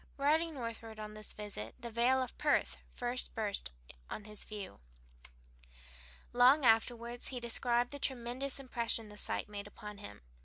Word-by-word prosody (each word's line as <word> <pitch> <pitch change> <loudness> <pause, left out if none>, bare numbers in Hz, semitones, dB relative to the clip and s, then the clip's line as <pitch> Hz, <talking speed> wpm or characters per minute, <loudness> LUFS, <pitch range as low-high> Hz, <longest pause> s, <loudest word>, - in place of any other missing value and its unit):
Riding 310 +3 +3
northward 230 -3 -5
on 210 0 -6
this 215 0 -5
visit 200 - -5
the 235 0 -6
vale 250 +3 +4
of 250 - -7
Perth - - +2
first 245 +1 -3
burst 210 - -2 0.4
on 215 - -5
his 210 0 -4
view. 205 - -7 1.5
Long 255 +4 +7
afterward 235 +1 +3
he 255 - +1
described 240 0 +1
the 285 - -5
tremendous 260 +1 0
impression 235 -4 +2
this 210 0 -4
sight - - -1
made 205 -1 -6
upon 210 0 -9
him. 205 - -9
235 Hz, 150 wpm, -35 LUFS, 210-255 Hz, 1.5 s, Long